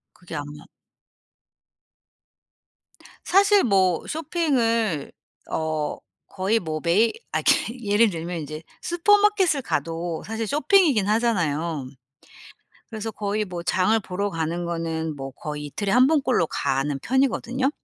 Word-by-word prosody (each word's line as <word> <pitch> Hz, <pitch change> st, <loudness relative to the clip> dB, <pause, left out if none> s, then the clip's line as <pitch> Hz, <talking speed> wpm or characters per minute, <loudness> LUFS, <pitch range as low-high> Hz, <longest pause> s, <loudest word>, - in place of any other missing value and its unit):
그게 175 Hz, -2 st, -11 dB
아마 145 Hz, +1 st, -7 dB, 2.6 s
사실 400 Hz, +1 st, +5 dB
뭐 190 Hz, -6 st, +2 dB
쇼핑을 235 Hz, -, 0 dB, 0.4 s
어 155 Hz, -1 st, -2 dB, 0.3 s
거의 200 Hz, +3 st, 0 dB
뭐 155 Hz, -2 st, -4 dB
매일 195 Hz, +7 st, +3 dB, 0.2 s
아 -, -, +1 dB
그 -, -, +6 dB, 0.3 s
예를 210 Hz, 0 st, +3 dB
들면 170 Hz, 0 st, -4 dB
인제 155 Hz, +1 st, -7 dB, 0.2 s
슈퍼마켓을 385 Hz, -3 st, +3 dB
가도 165 Hz, -1 st, -3 dB
사실 225 Hz, +1 st, -3 dB
쇼핑이긴 295 Hz, -, +3 dB
하잖아요. 170 Hz, -, 0 dB, 1.0 s
그래서 225 Hz, 0 st, -5 dB
거의 210 Hz, 0 st, -2 dB
뭐 180 Hz, -3 st, -6 dB
장을 190 Hz, +5 st, +2 dB
보러 200 Hz, +1 st, -3 dB
가는 165 Hz, +1 st, -2 dB
거는 165 Hz, -2 st, -3 dB
뭐 135 Hz, -1 st, -6 dB
거의 150 Hz, +2 st, -6 dB
이틀에 195 Hz, +7 st, -3 dB
1 255 Hz, +1 st, +6 dB
번 305 Hz, -1 st, +2 dB
꼴로 250 Hz, -11 st, +2 dB
가는 140 Hz, -1 st, -1 dB
편이거든요. 265 Hz, +2 st, 0 dB
195 Hz, 240 characters per minute, -24 LUFS, 160-245 Hz, 2.6 s, 그